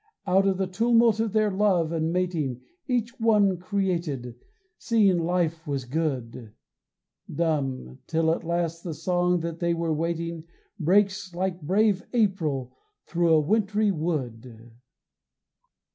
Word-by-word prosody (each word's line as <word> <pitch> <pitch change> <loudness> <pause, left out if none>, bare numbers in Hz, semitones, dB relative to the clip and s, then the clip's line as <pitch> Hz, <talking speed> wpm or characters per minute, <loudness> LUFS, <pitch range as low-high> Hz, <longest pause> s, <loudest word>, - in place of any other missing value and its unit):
Out 195 +1 +3
of 190 -1 +1
the 190 - 0
tumult 230 +3 +3
of 225 -2 0
their 215 0 +2
love 190 -5 +2
and 160 -1 -1
mating 170 -8 -1 0.3
Each 250 0 -1
one 210 -4 +3
created, 175 - -2 0.5
seeing 205 -6 +3
life 165 -1 -1
was 140 -3 -2
good 125 -6 -3 0.8
Dumb, 135 - -2
till 160 0 +2
at - - -5
last 170 0 -2
the 165 -4 -5
song 180 -1 +1
that 165 0 -5
they 170 -1 +1
were 165 -1 -1
waiting 165 +1 -3 0.3
Breaks 190 +2 +1
like 185 0 -2
brave 195 +4 +2
April 160 - 0 0.3
thru 170 0 +1
a 160 -1 +6
wintry 210 +5 +1
wood. 125 - -4
170 Hz, 130 wpm, -26 LUFS, 155-195 Hz, 0.8 s, a